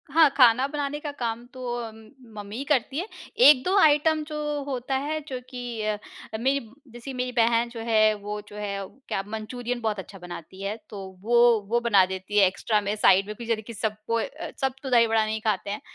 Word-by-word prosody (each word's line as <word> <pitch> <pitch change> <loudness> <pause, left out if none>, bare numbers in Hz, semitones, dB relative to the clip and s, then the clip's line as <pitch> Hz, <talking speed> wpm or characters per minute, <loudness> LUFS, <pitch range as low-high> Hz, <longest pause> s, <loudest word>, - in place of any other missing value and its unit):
हाँ, 315 +1 +6
खाना 250 -1 +6
बनाने 290 0 -3
का 295 -1 -5
काम 235 0 -3
तो 255 -1 -7 0.2
अम, 225 -1 -8 0.4
मम्मी 205 +1 -7
ही 270 - -3
करती 280 -1 +1
है, 370 - -3 0.3
1-2 360 - +6
आइटम 310 -1 +4
जो 305 -1 -5 0.3
होता 265 -1 -3
है, 300 +3 -2
जो 260 -3 -4
कि 245 -3 -5
अ 215 0 -1 0.4
अ, - - -1
मेरी, 265 +5 +1 0.3
जैसी 240 +3 -8
मेरी 250 0 -2
बहन 235 0 +2
जो 235 -1 -8
है 215 -1 +5
वो 210 0 -5
जो 205 - -12
है, 205 -1 -3 0.3
क्या 195 - -1
मंचूरियन 240 +3 -4
बहुत 215 -3 -1
अच्छा 195 +1 -9
बनाती 175 +1 -9
है, 200 +2 -2
तो 205 -2 -7 0.2
वो 235 +1 +5
वो 235 +1 +2
बना 210 -6 +4
देती 190 +2 -4
है 195 - +7
एक्स्ट्रा 210 +3 0
में, 205 +1 -2
साइड 195 -2 +4
में, 210 - -4
फिर 235 +2 -9
जाने 230 -2 0
कि 230 +2 -10
सब 215 0 -2
कोई 230 0 +1
अ, - - -8
सब 265 -1 +1
तो 265 - -4
दही 235 -2 +5
बड़ा 220 -1 +2
नहीं 215 0 -2
खाते 210 -2 -1
हैं। 205 +2 -4
230 Hz, 220 wpm, -26 LUFS, 210-260 Hz, 0.4 s, है